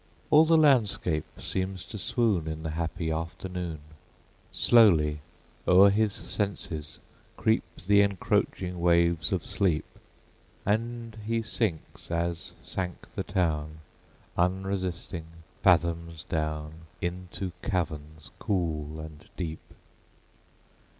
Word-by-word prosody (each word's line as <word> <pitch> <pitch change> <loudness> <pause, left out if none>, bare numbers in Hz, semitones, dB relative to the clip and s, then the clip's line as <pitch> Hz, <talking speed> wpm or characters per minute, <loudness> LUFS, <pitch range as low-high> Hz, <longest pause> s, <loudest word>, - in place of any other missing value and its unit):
All 155 +2 +8
the 165 0 +5
landscape 110 - +3
seems 95 -1 -3
to 105 - -7
swoon 105 -8 +1
In 80 0 -4
the 80 - -2
happy 80 +1 -2
afternoon; 85 0 -4 0.7
Slowly 80 -11 +5 0.5
o'er 95 +2 +8
his 105 +1 +2
senses 85 -9 -2 0.4
creep - - +3 0.2
The 100 +4 +5
encroaching 95 -2 0
waves 85 -3 +3
of - - -1
sleep, 90 -6 +1 0.8
And 115 +2 -1
he 115 0 0
sinks 105 -7 -3
as 85 0 -2
sank 90 -2 -4
the - - -2
town, 80 -6 -1 0.6
Unresisting, 90 -2 -1 0.3
fathoms 85 -3 +2
down, 75 0 -3
Into 90 +1 -4
caverns 80 -3 -3
cool 80 -5 -1
and 80 -1 -10
deep! 80 -3 -4
85 Hz, 100 wpm, -28 LUFS, 80-100 Hz, 0.8 s, All